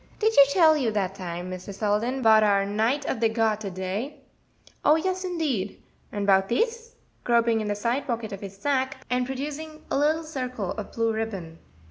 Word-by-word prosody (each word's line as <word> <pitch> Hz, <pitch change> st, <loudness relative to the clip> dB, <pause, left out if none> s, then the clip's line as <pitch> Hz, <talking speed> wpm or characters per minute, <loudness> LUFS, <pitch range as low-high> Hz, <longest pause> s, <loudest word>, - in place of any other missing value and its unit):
"Did 440 Hz, +1 st, +2 dB
she 280 Hz, -, +9 dB
tell 315 Hz, -1 st, +6 dB
you 265 Hz, -6 st, +1 dB
dat 195 Hz, -3 st, -1 dB
time, 180 Hz, -1 st, -6 dB
Mr. 185 Hz, +2 st, -7 dB
Selden, 215 Hz, +6 st, -1 dB
'bout 220 Hz, -1 st, +7 dB
our 200 Hz, -2 st, +3 dB
Knight 225 Hz, +8 st, 0 dB
of -, -, -2 dB
de 225 Hz, 0 st, +3 dB
Garter 220 Hz, -2 st, 0 dB
day?" 190 Hz, +9 st, -4 dB, 0.6 s
"Oh, 300 Hz, -, +6 dB
yes, 370 Hz, +3 st, -1 dB
indeed." 300 Hz, -, -2 dB, 0.3 s
"And 205 Hz, -1 st, -2 dB
'bout 195 Hz, -1 st, +4 dB
dis?" 465 Hz, -, -1 dB, 0.3 s
groping 235 Hz, -2 st, +3 dB
in 215 Hz, -, -3 dB
the 205 Hz, -, -1 dB
side 235 Hz, +7 st, -1 dB
pocket 230 Hz, -3 st, -3 dB
of 195 Hz, -, -7 dB
his 195 Hz, -1 st, -8 dB
sacque, 265 Hz, +2 st, 0 dB
and 250 Hz, 0 st, +1 dB
producing 300 Hz, +4 st, -6 dB
a -, -, +2 dB
little 310 Hz, +3 st, +2 dB
circle 255 Hz, -, -4 dB
of 215 Hz, -, -6 dB
blue 230 Hz, -1 st, 0 dB
ribbon. 195 Hz, -7 st, -5 dB
230 Hz, 185 wpm, -26 LUFS, 205-285 Hz, 0.6 s, she